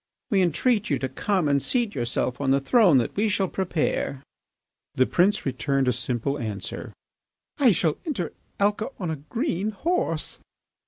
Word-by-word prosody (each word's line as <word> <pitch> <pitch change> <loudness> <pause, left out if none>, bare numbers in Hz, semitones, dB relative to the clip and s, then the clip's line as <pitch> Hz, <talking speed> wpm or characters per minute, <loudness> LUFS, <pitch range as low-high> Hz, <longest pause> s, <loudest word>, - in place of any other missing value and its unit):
We 195 -2 +4
entreat 205 - +1
you 140 - +2
to 130 - -2
come 180 +5 0
and 140 -1 +2
seat 240 - 0
yourself 120 +1 -1
on 135 - 0
the 135 +1 +4
throne 185 - +5
that 120 - 0
we 210 +2 +2
shall 195 -1 +1
prepare." 165 -7 -1 0.7
The 130 - +4
prince 195 +8 +2
returned 135 +1 0
a 125 - +3
simple 130 +4 -2
answer: 105 -4 -5 0.7
"I 260 -5 +6
shall 160 -4 +1
enter 200 - -2 0.3
Alca 205 +2 +1
on 175 -4 -2
a 155 - -3
green 225 - -1
horse." 215 - -1
170 Hz, 160 wpm, -25 LUFS, 135-205 Hz, 0.7 s, I